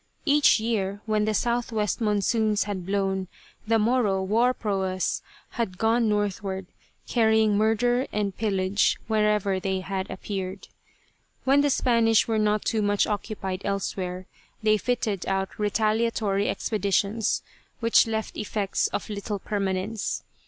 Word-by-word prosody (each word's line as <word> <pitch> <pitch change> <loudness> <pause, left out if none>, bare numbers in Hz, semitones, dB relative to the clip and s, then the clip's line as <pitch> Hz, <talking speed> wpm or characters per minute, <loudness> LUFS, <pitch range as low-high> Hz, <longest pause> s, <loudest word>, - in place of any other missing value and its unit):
Each 290 -5 +5
year 205 -3 -1
when 215 -1 +1
the 215 - 0
southwest 230 -2 -1
monsoons 215 0 +1
had 190 -4 -5
blown, 195 -1 0 0.4
the 225 0 +4
Moro 215 -4 +2
war 230 +6 +3
proas 190 -5 -1 0.3
had 205 -6 -3
gone 225 +1 +2
northward 200 -2 -1 0.4
carrying 220 -3 +3
murder 240 +4 +2
and 200 -3 -1
pillage 195 -2 +1
wherever 210 -3 +1
they 190 0 -2
had 190 0 -4
appeared. 190 0 -5 0.7
When 275 +2 +4
the 290 - +2
Spanish 230 -4 +3
were 225 -1 +1
not 210 0 +1
too 220 - +1
much 205 0 +2
occupied 200 -3 -3
elsewhere 185 -2 -3 0.4
they 215 -1 +4
fitted 225 -5 -1
out 195 +1 -2
retaliatory 215 -1 +1
expeditions 205 +1 0 0.4
which 230 -1 +4
left 220 -1 -3
effects 205 -1 -1
of - - -4
little 205 0 -4
permanence. 195 +1 -2
210 Hz, 125 wpm, -26 LUFS, 195-225 Hz, 0.7 s, Each